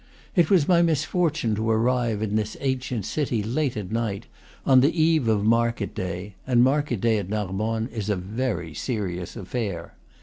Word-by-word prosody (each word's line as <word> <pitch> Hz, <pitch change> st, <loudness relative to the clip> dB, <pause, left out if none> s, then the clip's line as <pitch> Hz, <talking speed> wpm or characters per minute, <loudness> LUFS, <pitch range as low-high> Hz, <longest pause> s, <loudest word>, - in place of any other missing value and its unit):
It 175 Hz, -4 st, +4 dB
was 180 Hz, -7 st, +4 dB
my 175 Hz, -2 st, +5 dB
misfortune 160 Hz, -5 st, +1 dB
to 110 Hz, +2 st, -1 dB
arrive 115 Hz, -1 st, +1 dB
at 105 Hz, -1 st, -1 dB
this 110 Hz, 0 st, -1 dB
ancient 130 Hz, -5 st, -2 dB
city 125 Hz, -8 st, -1 dB
late 125 Hz, +3 st, -1 dB
at 100 Hz, -2 st, -5 dB
night, 110 Hz, -2 st, -2 dB, 0.4 s
on 130 Hz, -1 st, +6 dB
the 155 Hz, +5 st, +2 dB
eve 160 Hz, -5 st, +3 dB
of 105 Hz, -2 st, +2 dB
market 115 Hz, -1 st, +1 dB
day; 95 Hz, +2 st, -5 dB
and 120 Hz, -2 st, +4 dB
market 135 Hz, -3 st, +1 dB
day 115 Hz, -2 st, +3 dB
at 95 Hz, -2 st, -6 dB
Narbonne 110 Hz, +2 st, -1 dB
is 110 Hz, -4 st, -4 dB
a 105 Hz, -, +2 dB
very 95 Hz, -3 st, -3 dB
serious 90 Hz, -, -3 dB
affair. 95 Hz, -4 st, -4 dB
115 Hz, 170 wpm, -25 LUFS, 105-130 Hz, 0.4 s, on